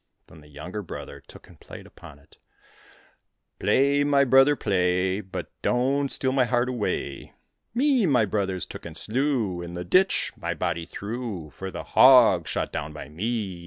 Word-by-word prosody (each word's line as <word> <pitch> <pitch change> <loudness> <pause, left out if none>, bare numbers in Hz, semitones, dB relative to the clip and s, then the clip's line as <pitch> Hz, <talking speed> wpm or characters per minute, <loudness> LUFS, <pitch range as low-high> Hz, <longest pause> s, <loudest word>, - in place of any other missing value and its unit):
Then 80 - -16
the 75 - -18
younger 80 +8 -7
brother 90 - -9
took - - -16
and - - -18
played - - -12
upon 70 - -14
it: 70 - -24 0.6
" - - -36
Play, 140 +1 +2
my 140 -1 +3
brother, 135 +2 +5
play. 95 -2 0
But 95 -2 -7
don't 135 +3 0
steal 130 - -1
my 130 -1 +2
heart 120 +1 0
away 120 -5 -3
I - - -23 0.4
Me 260 -5 +3
my 125 -7 +3
brothers 95 -3 -2
took - - -10
and 80 -1 -9
slew. 115 - -1
In 85 0 -8
the 90 0 -5
ditch 190 - +2
my - - -4
body 85 0 -3
threw. 100 -7 -6
For 95 +9 -7
the - - -7
hog 125 -10 +6
shot - - -2
down 75 +1 -4
by 75 -2 -9
me. 100 +2 -3
105 Hz, 175 wpm, -25 LUFS, 90-130 Hz, 0.6 s, hog